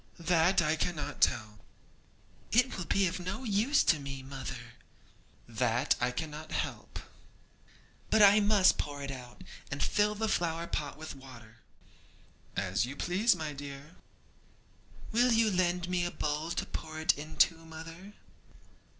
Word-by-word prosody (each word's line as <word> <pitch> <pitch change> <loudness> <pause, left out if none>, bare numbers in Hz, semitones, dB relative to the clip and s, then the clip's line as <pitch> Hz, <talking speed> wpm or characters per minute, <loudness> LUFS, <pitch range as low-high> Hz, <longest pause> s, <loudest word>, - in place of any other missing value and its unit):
'That 175 +1 +3
I 155 0 +2
cannot 165 -1 -3
tell.' 105 -2 +1 0.9
'It 245 +3 +3
will 185 - -4
be 195 +3 +2
of 180 +1 -2
no 185 +9 -4
use 225 +6 +3
to 160 - +3
me, 135 -1 -6
mother.' 130 -3 -7 0.7
'That 120 +3 +1
I 125 - +2
cannot 155 +3 -6
help.' - - -4 1.1
'But 220 -1 +5
I 205 +1 +8
must 205 -2 +4
pour 145 -1 -4
it 135 - -4
out, 125 -2 -10 0.3
and 135 - -2
fill 210 0 +2
the 220 +1 -1
flower 170 -4 0
pot 150 -3 -4
with 155 0 -7
water.' 120 -5 -13 1.0
'As 95 +1 0
you 130 +4 -5
please, 190 +8 +2
my 155 -3 -4
dear.' 140 +3 -9 1.2
'Will 245 +2 +4
you 225 -1 +3
lend 180 -1 +1
me 180 -1 0
a 175 - 0
bowl 150 0 -2
to 170 - -2
pour 155 0 -6
it 160 - +3
into, 155 +3 +2
mother?' 165 +5 -10
160 Hz, 145 wpm, -31 LUFS, 135-185 Hz, 1.2 s, I